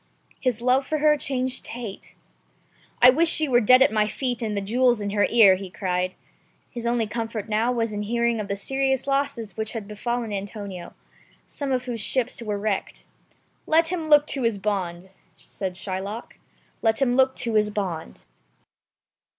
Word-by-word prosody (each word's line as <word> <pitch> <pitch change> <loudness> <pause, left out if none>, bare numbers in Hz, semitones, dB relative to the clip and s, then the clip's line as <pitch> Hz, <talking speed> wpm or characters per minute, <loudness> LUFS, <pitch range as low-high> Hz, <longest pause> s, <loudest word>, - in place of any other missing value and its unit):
His 240 -3 -1
love 255 +2 +2
for 310 - 0
her 300 0 +4
changed 260 -2 -1
to - - -8
hate. 230 -5 -8 0.9
"I 250 - +10
would 325 +6 +2
she 315 -1 +4
were 245 -2 +4
dead 255 +4 +7
at 220 - +2
my 215 -1 +2
feet 245 +1 -3
and 215 -3 -2
the - - +2
jewels 240 +4 +2
in 205 -1 -3
her 205 0 +2
ear," 220 -5 +7
he 195 0 -8
cried. 185 -1 -2 0.6
His 235 -1 -5
only 235 -1 +1
comfort 225 -1 -4
now 220 +3 +1
was 230 -2 -1
in 210 0 -3
hearing 235 +2 0
of 210 - -4
the 200 - -2
serious 265 +5 -1
losses 275 -7 -2
which 220 0 -2
had 220 -4 -6
befallen 230 +1 -3
Antonio, 200 -2 -6 0.5
some 280 -2 -5
of 255 -1 0
whose 240 -3 -4
ships 255 +3 -2
were 210 -3 -3
wrecked. 200 -1 -3 0.6
"Let 325 +1 +3
him 335 -3 -3
look 295 -1 +6
to 280 -2 -2
his 230 -3 +1
bond," 190 -3 -3 0.3
said 190 -2 -6
Shylock, 190 +4 -6 0.4
"let 225 -1 +2
him 250 -3 +2
look 265 0 +3
to 235 -2 -2
his 210 -1 +3
bond." 185 - -5
230 Hz, 180 wpm, -24 LUFS, 205-255 Hz, 0.9 s, I